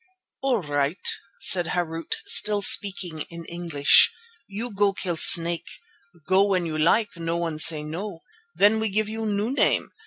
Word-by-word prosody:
"All 255 Hz, -7 st, -1 dB
right," 145 Hz, +3 st, -3 dB, 0.3 s
said 175 Hz, -3 st, +4 dB
Harût, 165 Hz, -2 st, -4 dB
still 210 Hz, -, +4 dB
speaking 185 Hz, -6 st, +1 dB
in 170 Hz, 0 st, -11 dB
English, 165 Hz, -5 st, +3 dB, 0.4 s
"you 215 Hz, +3 st, -7 dB
go 200 Hz, 0 st, 0 dB
kill 180 Hz, -2 st, -4 dB
snake. 170 Hz, +1 st, +4 dB, 0.6 s
Go 190 Hz, +1 st, +2 dB
when 190 Hz, -3 st, -1 dB
you 160 Hz, -2 st, -5 dB
like, 185 Hz, +8 st, +1 dB
no 165 Hz, 0 st, -4 dB
one 165 Hz, -2 st, -5 dB
say 155 Hz, -1 st, +4 dB
no. 165 Hz, +3 st, -8 dB, 0.3 s
Then 210 Hz, +2 st, +2 dB
we 220 Hz, 0 st, -3 dB
give 215 Hz, +2 st, -2 dB
you 220 Hz, 0 st, -5 dB
new 210 Hz, +3 st, -3 dB
name. 275 Hz, -, -1 dB
180 Hz, 155 wpm, -23 LUFS, 165-205 Hz, 0.6 s, said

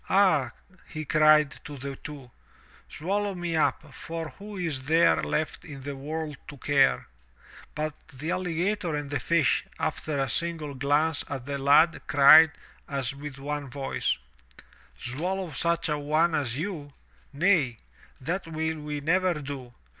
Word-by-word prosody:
"Ah," 185 Hz, -10 st, +4 dB, 0.4 s
he 155 Hz, -1 st, -6 dB
cried 155 Hz, -1 st, +4 dB
to 145 Hz, -, -8 dB
the 135 Hz, +1 st, -5 dB
two, 140 Hz, -5 st, -10 dB, 0.6 s
"swallow 200 Hz, +4 st, -2 dB
me 175 Hz, -2 st, -2 dB
up, 155 Hz, -2 st, 0 dB
for 165 Hz, +5 st, -6 dB
who 205 Hz, 0 st, -8 dB
is 155 Hz, -8 st, -2 dB
there 145 Hz, -, +4 dB
left 145 Hz, -, -2 dB
in 140 Hz, -4 st, -9 dB
the 140 Hz, 0 st, -5 dB
world 150 Hz, +2 st, -5 dB
to 145 Hz, -, -9 dB
care?" 135 Hz, +1 st, +2 dB, 0.7 s
But 155 Hz, 0 st, -2 dB
the 155 Hz, +2 st, -5 dB
alligator 180 Hz, 0 st, -1 dB
and 145 Hz, -1 st, -4 dB
the 145 Hz, -, 0 dB
fish, 165 Hz, -6 st, +2 dB
after 150 Hz, -2 st, -2 dB
a 135 Hz, -, +1 dB
single 160 Hz, +2 st, -2 dB
glance 145 Hz, +3 st, +1 dB
at 135 Hz, -3 st, -5 dB
the 140 Hz, 0 st, -3 dB
lad, 150 Hz, +5 st, +5 dB
cried, 145 Hz, +3 st, +8 dB, 0.4 s
as 140 Hz, -2 st, -2 dB
with 140 Hz, -1 st, -8 dB
one 145 Hz, 0 st, -4 dB
voice: 135 Hz, +1 st, -1 dB, 0.8 s
"Swallow 175 Hz, +7 st, -3 dB
such 170 Hz, +4 st, 0 dB
a 150 Hz, -1 st, -1 dB
one 155 Hz, +3 st, +2 dB
as 130 Hz, -5 st, -1 dB
you? 155 Hz, -5 st, -5 dB, 0.4 s
Nay! 145 Hz, -, +2 dB, 0.4 s
that 165 Hz, +7 st, -3 dB
will 160 Hz, 0 st, -2 dB
we 150 Hz, -1 st, -4 dB
never 180 Hz, +4 st, +2 dB
do! 140 Hz, -4 st, -6 dB
150 Hz, 145 wpm, -27 LUFS, 140-165 Hz, 0.8 s, cried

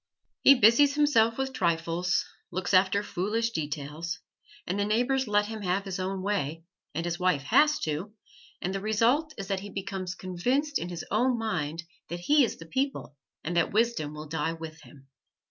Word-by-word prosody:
He 275 Hz, -, +8 dB
busies 255 Hz, +5 st, +5 dB
himself 230 Hz, -7 st, +3 dB
with 265 Hz, 0 st, -2 dB
trifles, 170 Hz, -2 st, 0 dB, 0.2 s
looks 185 Hz, +2 st, -3 dB
after 190 Hz, +2 st, +4 dB
foolish 210 Hz, +5 st, -1 dB
details, 155 Hz, +1 st, -4 dB, 0.5 s
and 185 Hz, +3 st, -2 dB
the -, -, +2 dB
neighbors 245 Hz, +5 st, +1 dB
let 205 Hz, 0 st, +3 dB
him 220 Hz, 0 st, -6 dB
have 190 Hz, +1 st, 0 dB
his 190 Hz, -1 st, -4 dB
own 190 Hz, 0 st, -3 dB
way 165 Hz, -6 st, -2 dB, 0.3 s
and 165 Hz, +2 st, -2 dB
his 175 Hz, +1 st, -2 dB
wife 180 Hz, -7 st, +2 dB
has 295 Hz, -, +4 dB
to, 160 Hz, +7 st, -3 dB, 0.5 s
and 185 Hz, -, -1 dB
the 195 Hz, -, -2 dB
result 235 Hz, +9 st, +2 dB
is 195 Hz, -2 st, -5 dB
that 195 Hz, -1 st, 0 dB
he 200 Hz, +2 st, -8 dB
becomes 190 Hz, -2 st, -4 dB
convinced 250 Hz, -, -1 dB
in 175 Hz, -, -4 dB
his 175 Hz, -2 st, -6 dB
own 250 Hz, -1 st, +2 dB
mind 170 Hz, -8 st, -2 dB, 0.3 s
that 175 Hz, 0 st, -5 dB
he 290 Hz, +9 st, +4 dB
is 235 Hz, -, -1 dB
the 165 Hz, -, -10 dB
people 260 Hz, -, -2 dB, 0.3 s
and 175 Hz, +3 st, -3 dB
that 170 Hz, -, +2 dB
wisdom 215 Hz, -10 st, +1 dB
will 155 Hz, +1 st, -7 dB
die 160 Hz, +1 st, -1 dB
with 160 Hz, -1 st, -9 dB
him. 135 Hz, -2 st, -16 dB
195 Hz, 180 wpm, -28 LUFS, 165-230 Hz, 0.5 s, He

